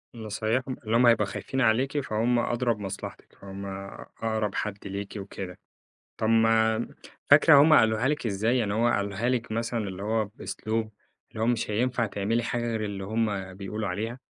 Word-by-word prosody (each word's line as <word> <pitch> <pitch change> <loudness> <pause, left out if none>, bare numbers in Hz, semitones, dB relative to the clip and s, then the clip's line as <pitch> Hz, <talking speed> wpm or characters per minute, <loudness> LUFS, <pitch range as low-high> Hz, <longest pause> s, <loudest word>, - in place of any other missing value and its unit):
نصايِحهُم، 115 +4 -2
اللي 110 +1 +1
هُم 125 - +5
هيبقوا 115 -3 +5
خايفين 130 +6 -3
عليكِ، 130 +5 +2
فهُم 120 -1 +1
أدرى 120 0 +1
بمصلحتِك، 100 -3 -8
هُم 100 0 -7
آآ 100 0 -7 0.2
أقرب 110 -3 -1
حد 105 -2 -2
ليكِ 100 +1 -5
وكده. 95 -2 -7 0.6
طَب 110 - -1
ما 115 0 +3 0.4
فاكرة 150 +1 +8
هُم 155 +1 +5
قالوها 110 +2 +4
لِك 150 -5 -1
إزّاي؟ 110 +5 +1
يعني 105 -3 0
هُم 115 +2 +2
قالوها 100 +4 -1
لِك 120 -3 -1
مثلًا، 115 -2 -2
اللي 95 +1 -7
هو 110 +1 +1
بأسلوب 110 +1 -4 0.4
اللي 110 - -5
هو - - +2
مش 120 -3 0
هينفع 120 +2 +1
تعملي 105 +4 -1
حاجة 120 +1 -2
غير 110 -2 -1
اللي 100 -2 -4
هُم 100 -3 -2
بيقولوا 100 +1 -4
عليها، 110 +7 -3
110 Hz, 170 wpm, -27 LUFS, 100-120 Hz, 0.6 s, فاكرة